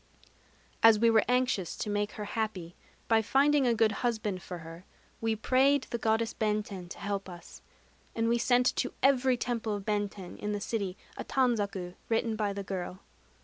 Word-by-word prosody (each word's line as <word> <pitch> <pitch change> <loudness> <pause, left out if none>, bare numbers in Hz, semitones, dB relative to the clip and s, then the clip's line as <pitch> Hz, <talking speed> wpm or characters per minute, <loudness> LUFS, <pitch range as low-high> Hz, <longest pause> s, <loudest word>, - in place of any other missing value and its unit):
As 225 -1 +8
we 230 +2 +4
were 220 -1 +5
anxious 250 -7 +1
to - - -4
make 205 0 -1
her 210 - -5
happy 205 -6 -3 0.3
by 225 -1 +4
finding 275 +4 +3
a 235 - +3
good 220 -1 +3
husband 215 -6 -1
for 180 -2 -7
her, 165 +1 -10 0.4
we 225 -1 +1
prayed 265 +5 +3
the 235 - -2
Goddess 225 +1 +1
Benten 210 -4 -2
to - - -8
help 200 -1 -3
us; 175 -1 -11 0.5
and 225 0 +1
we 235 +1 +2
sent 245 +1 +3
to 255 - -1
every 260 -2 +4
temple 230 -3 -2
of 200 -1 -7
Benten 205 -3 -3
in 210 0 -2
the 205 - -2
city 200 -3 -3 0.2
a - - -4
tanzaku 205 -8 0 0.2
written 225 0 +1
by 210 -2 -1
the 200 0 -5
girl. 185 -1 -5
220 Hz, 180 wpm, -30 LUFS, 200-235 Hz, 0.5 s, As